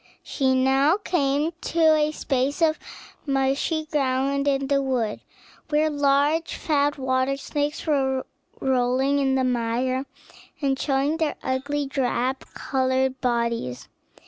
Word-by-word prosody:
She 265 -2 0
now 270 +6 +3
came 300 -5 0
to 320 -2 +3
a 305 0 +2
space 280 +2 -1
of 315 -1 +2 0.5
marshy 275 +4 0
ground 275 -1 0
in 275 -1 +1
the 275 0 +1
wood, 250 -6 -1 0.5
where 305 +1 +2
large, 290 +3 +1
fat 290 -2 0
water 260 0 0
snakes 290 +1 -3
were 265 -4 0 0.3
rolling 265 +2 +1
in 270 -1 +1
the 260 - +1
mire, 250 +2 -1 0.5
and 270 -3 0
showing 280 +2 0
their 320 -2 -1
ugly, 280 +3 -1
drab 265 -1 -1 0.2
colored 260 0 0
bodies. 235 - -1
275 Hz, 120 wpm, -24 LUFS, 260-290 Hz, 0.5 s, now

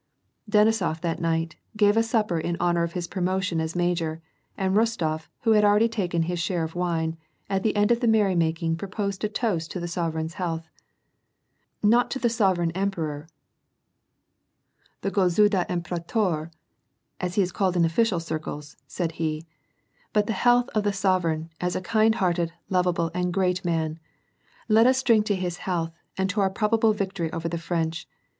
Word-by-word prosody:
Denisof 210 -6 +3
that 170 -2 -2
night, 165 -1 -1 0.2
gave 205 0 +4
a 225 - +5
supper 220 -6 0
in 170 +2 -2
honor 175 -1 +2
of 170 0 -2
his 175 -2 -3
promotion 185 -2 -1
as 160 +1 -3
major, 170 -2 0 0.4
and 190 -1 0
Rostof, 170 -9 0
who 225 - +2
had 210 -1 +5
already 210 +2 +5
taken 180 -7 -1
his 175 +1 -2
share 170 0 -1
of 160 0 -4
wine, 165 -2 -1 0.3
at 195 0 +1
the 215 +1 0
end 205 +2 +3
of 235 - +3
the 240 - 0
merrymaking 170 -6 +2
proposed 200 +2 -4
a 215 - +1
toast 205 -8 -1
to 185 - -4
the 175 - -4
sovereign's 165 -1 -2
health: 165 -2 -2 0.6
" - - -46
Not 245 +1 +3
the 260 -3 0
sovereign 190 -7 +2
emperor, 165 -5 -3 1.7
the 195 - -1
gofnidthr 195 0 +3
imperdtor, 175 -1 -1 0.7
as 180 0 -3
he 200 - +4
is 180 - -3
called 185 -1 0
in 170 - +4
official 180 +3 +2
circles," 155 -2 -6
said 170 -3 -2
he, 155 0 -2 0.3
" - - -39
but 210 -1 +3
the 225 - -1
health 245 +4 +3
of 215 - +1
the 205 -1 +1
sovereign, 170 -5 0
as 180 0 -1
a - - 0
kind 220 +3 +3
hearted, 175 -5 0 0.2
lovable, 180 -3 +1
and 180 0 -1
great 185 -1 +1
man, 165 -2 -1 0.4
— - - -46 0.3
let 225 +1 +5
us 260 0 +3
drink 220 -4 +4
to 205 - +2
his 180 -2 -3
health, 170 -3 -2 0.3
and 190 0 +1
to 205 +1 0
our 195 - +3
probable 220 +3 +2
victory 195 -5 -2
over 165 -1 -3
the 170 0 -3
French. 165 -1 -2
180 Hz, 175 wpm, -25 LUFS, 165-210 Hz, 1.7 s, a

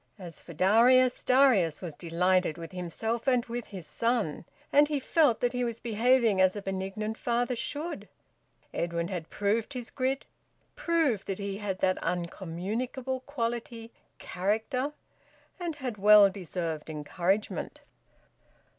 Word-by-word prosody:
As 175 -5 -9
for 170 - -11
Darius, 240 - +4
Darius 250 - +4
was 175 -4 -6
delighted 180 +1 +1
with 165 -1 -8
himself 220 - -3
and 250 -2 +3
with 240 0 -5
his 190 -5 -8
son, 225 -5 -1 0.3
and 290 +1 +6
he 295 -1 -1
felt 275 -3 +2
that 245 0 +1
he 250 0 -1
was 235 -1 -3
behaving 230 -2 +3
as 185 +1 +4
a 205 - -4
benignant 195 +3 -4
father 240 +1 0
should. 295 +8 -5 0.6
Edwin 170 0 -2
had 175 -4 -5
proved 210 +6 -1
his 245 -3 -6
grit, 265 0 -1 0.5
proved 320 - +1
that 195 - -2
he 200 -1 -4
had 195 -3 -4
that 185 0 +2
uncommunicable 195 +10 -3
quality, 235 -3 -4 0.3
`character,' 225 +9 -1 0.7
and 340 -3 -3
had 250 -7 -5
well 205 0 +8
deserved 170 -5 -4
encouragement. 175 +7 -2
215 Hz, 135 wpm, -29 LUFS, 185-250 Hz, 0.7 s, well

